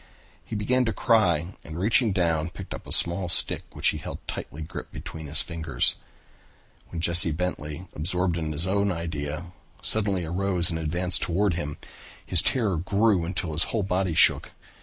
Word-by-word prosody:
He 110 - -7
began 125 +5 +1
to 115 - -1
cry 90 -6 +2
and 80 +1 -8
reaching 110 +4 +3
down 85 -4 0
picked 95 +2 -9
up - - -9
a - - -9
small 85 +1 +2
stick, - - +3
which - - +4
he - - -2
held - - -7
tightly 80 +2 -6
gripped 80 - -9 0.2
in 80 -2 -7
his 75 +2 +4
fingers. 80 -7 0 0.9
When 85 - -7
Jesse 85 0 +4
Bentley, 80 0 -4
absorbed 90 +2 -1
in 80 -2 -3
his 75 +3 -2
own 100 +1 +1
idea, 80 -1 -5 0.3
suddenly 100 -5 +1
arose 90 0 +1
and 80 - -3
advanced 90 +3 0
toward 95 +2 +1
him, 75 -3 -4 0.5
his 85 - +7
terror 110 -9 +1
grew 100 +1 +1
until 90 -2 -3
his 80 +2 +1
whole 110 -3 -2
body 95 -2 -1
shook. - - +5
85 Hz, 170 wpm, -25 LUFS, 80-95 Hz, 0.9 s, his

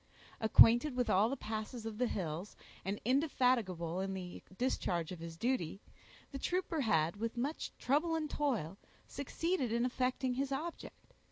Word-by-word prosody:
Acquainted 240 +5 +6
with 250 -1 +1
all 205 +4 +4
the 275 - -2
passes 220 +1 -5
of 220 -1 -5
the 250 - +2
hills, 175 -1 -4 0.3
and 195 +2 -2
indefatigable 240 - +1
in 195 0 -2
the 180 -2 -7 0.2
discharge 180 -10 -1
of 180 - -6
his 165 0 -7
duty, 225 -6 -1 0.5
the 275 - -5
trooper 355 -1 -1
had, 170 - +2
with 230 +2 -3
much 280 +6 -2
trouble 315 +5 +1
and 315 -1 -1
toil, 225 - -1 0.3
succeeded 285 -1 -2
in 235 +1 +2
effecting 255 0 0
his 275 +2 -2
object. 320 +5 -6
240 Hz, 155 wpm, -35 LUFS, 195-275 Hz, 0.5 s, Acquainted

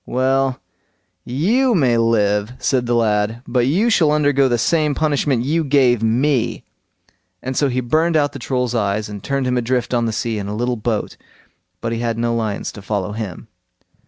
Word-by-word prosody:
"Well, 130 +1 +1 0.7
you 225 - +1
may 130 -8 +3
live", 105 -1 +1
said 125 -2 0
the 120 - +1
lad, 110 +1 0
"but 125 0 +1
you 200 - +2
shall 160 -8 +3
undergo 145 -2 +3
the 120 - +1
same 150 +3 +1
punishment 145 -5 0
you 160 +4 +1
gave 130 -5 +3
me"; 120 +3 0 0.8
and 130 +1 -4
so 140 +1 +2
he 130 0 -1
burned 155 +7 +1
out 145 -1 +1
the 135 - -8
Troll's 125 -1 -2
eyes, 105 -2 -1
and 100 -2 -8
turned 140 +2 -1
him 125 0 0
adrift 125 +1 -1
on 120 -1 +1
the - - -1
sea 110 0 -2
in 100 - -5
a 105 - -4
little 120 +2 -1
boat, 110 -1 -3 0.6
but 115 - -2
he 115 - -2
had 115 -1 -2
no 120 0 0
lions 110 -3 -2
to 105 - -11
follow 100 -1 -3
him. 105 -4 -6
125 Hz, 190 wpm, -19 LUFS, 115-140 Hz, 0.8 s, may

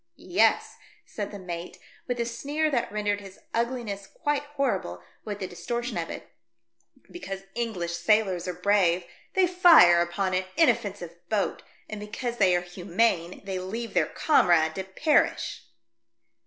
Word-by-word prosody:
"Yes," - - +1 0.3
said 205 -2 -5
the 205 - -8
mate, 175 -2 -7 0.3
with 245 -1 -2
a 235 - +1
sneer 290 +7 -1
that 240 -6 -1
rendered 205 -1 -1
his 195 -1 -12 0.2
ugliness 230 -5 -2
quite 295 -1 -1 0.2
horrible 190 - -1 0.2
with 205 -2 -4
the 195 - -4
distortion 235 +6 -4
of 170 -1 -3
it, - - -7 0.4
" 115 - -29
because 195 - -7
English 215 -8 -3
sailors 185 0 +1
are 180 - -2
brave 180 -1 +2 0.3
they 380 -1 +5
fire 340 - +7
upon 185 +2 -1
an 185 +1 0
inoffensive 205 - +1 0.2
boat, 210 -3 -1 0.3
and 215 - -6
because 235 +3 -5
they 185 -4 +4
are 175 - +1
humane 180 0 -1
they 190 -1 -3
leave 225 +6 -5
their - - +2
comrade 170 - +3
to 190 - -4
perish 190 - +1
200 Hz, 150 wpm, -27 LUFS, 180-235 Hz, 0.4 s, fire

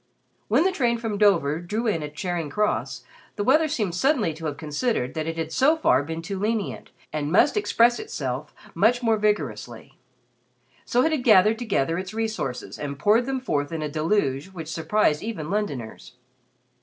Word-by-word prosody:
When - - +3
the 380 - +2
train 240 -9 +1
from 225 -3 -3
Dover 165 -8 +3
drew 210 +7 -3
in 200 -8 0
at 150 0 -7
Charing 170 -1 -3
Cross, 210 +8 -1 0.3
the 205 - -2
weather 305 +8 +4
seemed 220 - -2
suddenly 230 - +1
to 160 +1 -6
have 145 -1 -4
considered 150 - -2
that 155 -1 -3
it 165 0 -3
had 160 -1 -3
so 290 - +3
far 130 - +3
been 160 +3 -5
too 190 +3 -4
lenient 215 0 -2 0.2
and 150 -1 -2
must 205 - +4
express 240 - +3
itself 135 +2 -4 0.2
much 230 +8 +2
more 225 -2 +3
vigorously. 210 0 -2 0.9
So 245 +1 +2
it 320 - +2
had 300 -5 -1
gathered 215 0 +5
together 170 - 0
its 190 +3 -7
resources 220 - -3
and 140 -1 -4
poured 220 - +3
them 265 -1 -1
forth 145 - -2
in 160 -2 -3
a 150 - -2
deluge 155 -2 0
which 170 -5 -8
surprised 160 -2 +1
even 195 -8 -5
Londoners. 145 - -4
195 Hz, 180 wpm, -24 LUFS, 155-230 Hz, 0.9 s, gathered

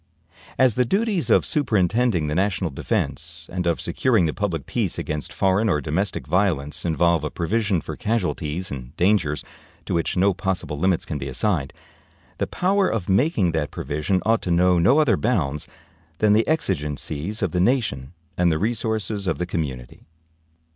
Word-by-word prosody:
As 130 -3 +4
the 125 - +2
duties 195 - 0
of - - +4
superintending 110 - +1
the 75 - -2
national 95 -1 0
defense 80 +5 -3
and 90 -1 -1
of 85 - +1
securing 115 -9 +1
the 80 - -1
public 85 -8 -2
peace - - -2
against 75 -1 -3
foreign 95 +3 +2
or 75 - +2
domestic 80 +8 -2
violence 85 -8 0
involve 85 -1 +2
a 75 - -1
provision 100 +2 0
for - - -6
casualties 90 -6 -2
and 65 -2 -8
dangers 85 -6 +2 0.4
to - - -3
which 85 +1 0
no 95 +2 +4
possible 90 -6 -3
limits 95 0 +1
can 75 - -4
be 70 - -5
assigned, 70 - 0 0.7
the - - 0
power 195 +1 +1
of 105 -6 -3
making 100 - +2
that 80 -2 -1
provision 75 +7 -2
ought 115 0 +3
to - - -4
know 90 +1 +4
no 95 - +4
other 135 -11 +4
bounds 80 - -1 0.5
than 105 +1 +4
the 110 +2 +3
exigencies 95 - -1
of 95 - 0
the 90 - 0
nation 90 - 0 0.3
and 90 -1 +4
the 80 - +1
resources 110 -1 -1
of 85 - 0
the 90 - -2
community. 70 -9 -5
90 Hz, 170 wpm, -23 LUFS, 80-110 Hz, 0.7 s, As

